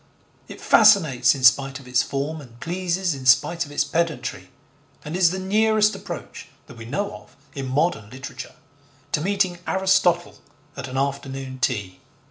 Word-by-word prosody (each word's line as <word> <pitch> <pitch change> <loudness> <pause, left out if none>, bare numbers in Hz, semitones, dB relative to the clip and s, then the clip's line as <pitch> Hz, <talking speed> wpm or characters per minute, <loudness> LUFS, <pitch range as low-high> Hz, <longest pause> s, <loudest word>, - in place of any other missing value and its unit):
It - - -10
fascinates 160 - +5
in 135 - -7
spite 135 +2 +4
of 130 - -15
its 125 +1 +2
form 145 +3 -4
and 120 -4 -15
pleases 175 +1 -1
in 130 -2 -6
spite 160 +6 +3
of - - -13
its 145 - +1
pedantry, 160 -8 -3 0.6
and 150 +3 -5
is 180 -2 +4
the 185 - -4
nearest 215 +2 +2
approach, - - -8 0.2
that 125 - -14
we 115 - -9
know 200 - -3
of, 105 0 -20 0.2
in 135 -2 -5
modern 130 -5 0
literature 130 +3 -9 0.6
to 150 - 0
meeting 190 -1 0
Aristotle 190 -2 +1 0.4
at 140 -1 -6
an 130 0 -6
afternoon 135 -1 -3
tea. 105 -8 -2
145 Hz, 160 wpm, -23 LUFS, 130-180 Hz, 0.6 s, fascinates